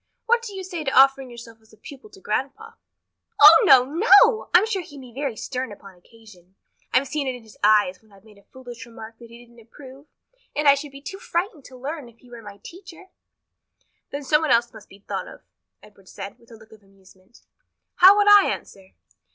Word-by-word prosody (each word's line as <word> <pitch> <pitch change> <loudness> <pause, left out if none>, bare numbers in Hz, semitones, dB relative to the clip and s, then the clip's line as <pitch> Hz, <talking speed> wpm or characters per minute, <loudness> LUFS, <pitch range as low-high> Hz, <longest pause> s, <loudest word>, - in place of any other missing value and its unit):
What 475 +1 +1
do 420 -4 -9
you 380 - -7
say 350 -4 -7
to 270 -2 +2
offering 270 -1 +3
yourself 230 -2 -14
as 220 0 -26
a - - -20
pupil 275 - -14
to 400 - -17
grandpa?" 405 +8 -5 0.7
"Oh, - - +8
no, 260 -8 +6
no! 425 - +3
I'm 360 +4 +4
sure 405 -4 -3
he 320 -4 -15
can 275 - -11
be 250 -2 -15
very 270 -3 -5
stern 255 -3 -6
upon 200 -1 -14
occasion. 185 -1 -21 0.4
I've 275 - +1
seen 295 -1 -4
it 260 - -3
in 245 - -13
his 220 -2 -18
eyes 205 -3 +2
when 220 -1 -28
I've 195 -1 -21
made 210 -2 -20
a - - -25
foolish 245 -3 -12
remark 225 -1 -13
that 235 -1 -15
he 235 +1 -15
didn't 235 0 -21
approve, 265 +5 -16 0.5
and 295 0 -1
I 280 - +8
should 280 +1 -6
be 275 0 -13
too 390 +4 -9
frightened 345 - -4
to 255 - -14
learn 280 0 -7
if 230 - -24
he 245 0 -22
were 235 -1 -11
my 205 -2 -13
teacher." 370 +1 -14 1.0
"Then 285 +1 -7
some 300 +3 +1
one 315 - -2
else 235 0 +1
must 220 -2 -15
be 195 - -16
thought - - -5
of," - - -15 0.4
Edward 195 -3 -20
said, 195 0 -10
with 235 - -25
a 230 - -14
look 220 0 -20
of 220 -1 -18
amusement. 195 +1 -24 0.6
"How 380 +3 +7
would 410 0 +2
I 410 -1 +6
answer?" 190 -1 -8
255 Hz, 225 wpm, -22 LUFS, 220-315 Hz, 1.0 s, Oh